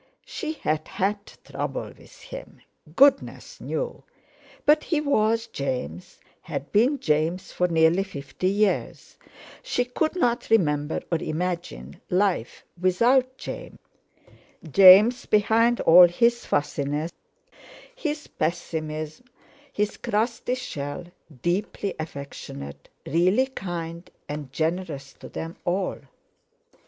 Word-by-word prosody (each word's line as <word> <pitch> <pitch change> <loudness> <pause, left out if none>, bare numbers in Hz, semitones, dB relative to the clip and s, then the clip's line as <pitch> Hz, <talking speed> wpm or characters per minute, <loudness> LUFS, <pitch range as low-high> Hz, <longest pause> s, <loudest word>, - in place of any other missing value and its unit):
She 315 -1 -4
had 155 - -2
"had 200 +2 -1 0.3
trouble" - - -4
with - - -18
him, - - -10 0.3
Goodness 275 0 +3
knew; - - -4 0.6
but 300 +1 +4
he 320 - +1
was 230 -6 +1
James, 125 - -5 0.2
had 140 - -6
been 250 +7 +3
James 160 +1 0
for 180 - +1
nearly 165 +2 +3
fifty 145 -2 -5
years; 205 0 -1 0.4
she 245 - -1
couldn't 250 -1 0
remember 150 -8 +2
or 165 - +1
imagine 155 - -4
life 180 - 0
without 250 +8 +3
James—James, 195 - +2
behind 225 +3 +3
all 175 +2 +9
his 235 +7 +1
fussiness, 145 +2 -1 0.8
his 305 -9 -3
pessimism, 155 +2 -4 0.5
his 210 0 -1
crusty 235 +2 -1
shell, 145 - -5 0.4
deeply 195 +2 -1
affectionate, 140 - -8 0.2
really 185 - +3
kind 175 -8 -6 0.2
and 145 -2 -6
generous 160 -3 -3
to - - -12
them 165 +1 -6
all! 185 +2 -1
180 Hz, 100 wpm, -25 LUFS, 155-235 Hz, 0.8 s, all